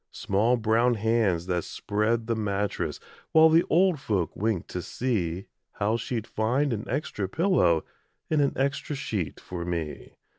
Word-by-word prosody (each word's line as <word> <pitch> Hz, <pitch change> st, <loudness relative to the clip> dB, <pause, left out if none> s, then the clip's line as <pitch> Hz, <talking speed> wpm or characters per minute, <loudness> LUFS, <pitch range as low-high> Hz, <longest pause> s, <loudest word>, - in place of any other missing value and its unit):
Small 110 Hz, +6 st, +1 dB
brown 115 Hz, +2 st, +2 dB
hands 105 Hz, -6 st, +1 dB
that 90 Hz, -2 st, -1 dB
spread 110 Hz, +2 st, -1 dB
the 115 Hz, 0 st, 0 dB
mattress 105 Hz, -2 st, -2 dB, 0.3 s
While 160 Hz, 0 st, +8 dB
the 165 Hz, +2 st, +5 dB
old 175 Hz, -1 st, +3 dB
folk 100 Hz, -, -1 dB
winked 105 Hz, -4 st, -1 dB
to 90 Hz, -, -3 dB
see 95 Hz, -7 st, -2 dB, 0.3 s
How 105 Hz, +2 st, 0 dB
she'd 115 Hz, -1 st, -3 dB
find 125 Hz, +6 st, 0 dB
an 110 Hz, 0 st, -4 dB
extra 105 Hz, -10 st, -2 dB
pillow 145 Hz, -, +2 dB, 0.4 s
And 155 Hz, -2 st, +2 dB
an 140 Hz, -, +2 dB
extra 140 Hz, +2 st, -1 dB
sheet 105 Hz, -, -3 dB
for 90 Hz, -2 st, -6 dB
me. 85 Hz, -3 st, -4 dB
110 Hz, 150 wpm, -27 LUFS, 95-130 Hz, 0.4 s, While